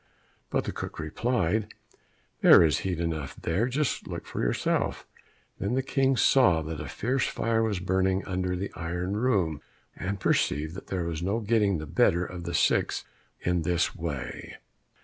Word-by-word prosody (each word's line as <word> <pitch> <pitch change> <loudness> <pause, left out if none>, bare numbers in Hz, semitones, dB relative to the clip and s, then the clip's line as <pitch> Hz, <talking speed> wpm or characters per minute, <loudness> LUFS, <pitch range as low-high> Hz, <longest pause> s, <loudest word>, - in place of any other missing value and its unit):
But - - 0
the - - -3
cook - - -6
replied, 105 +4 -1 0.7
"There - - +9
is 75 -4 +2
heat 90 -3 -2
enough 80 -5 -3
there, 100 +9 0
just 140 +2 -1
look - - -7
yourself." - - 0 0.5
Then 100 +5 -1
the 130 - +1
King 135 0 +1
saw 115 -15 +4
that 80 -1 -5
a - - -5
fierce 125 +3 0
fire 115 0 0
was 110 -4 0
burning 95 +1 +1
under 90 -1 -1
the 95 +2 -4
iron 90 +4 -3
room, 95 - +1 0.3
and 100 +1 -3
perceived 80 -3 +1
that 95 - -9
there 95 -2 -2
was 85 -1 -3
no 100 +6 0
getting 105 -3 +2
the 75 - -5
better 85 +2 +2
of 90 -1 -7
the 85 0 -3
six - - +2 0.4
in 90 -1 +1
this 85 +2 0
way. 70 -6 -5
90 Hz, 165 wpm, -28 LUFS, 80-110 Hz, 0.7 s, There